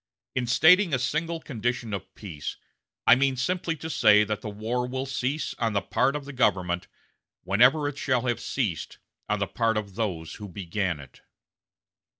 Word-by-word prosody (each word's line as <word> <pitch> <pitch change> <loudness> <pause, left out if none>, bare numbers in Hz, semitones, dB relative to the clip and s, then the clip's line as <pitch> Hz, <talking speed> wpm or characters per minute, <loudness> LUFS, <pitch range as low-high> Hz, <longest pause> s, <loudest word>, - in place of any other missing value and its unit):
In 125 -1 -1
stating 165 - +5
a - - +1
single 155 +6 -1
condition 120 -5 -3
of 95 -2 -6
peace, 80 -8 -6 0.5
I - - +8
mean 135 +1 +3
simply 170 +5 -1
to 160 - -7
say 105 -8 +5
that 105 0 -3
the 110 - -5
war 115 +4 -2
will 130 +1 -3
cease 135 +2 -2
on 115 -2 0
the 100 - +1
part 135 +7 +1
of 145 -2 -4
the 140 - -8
government 90 -8 +1 0.6
whenever 125 +10 +4
it 145 0 -5
shall 130 -2 +1
have 120 -2 0
ceased 105 - -3 0.3
on 105 - +2
the 100 - 0
part 115 +1 0
of 100 -2 -4
those 95 -7 -3
who 105 - -5
began 90 -2 -2
it." 70 - -14
120 Hz, 175 wpm, -26 LUFS, 100-135 Hz, 0.6 s, I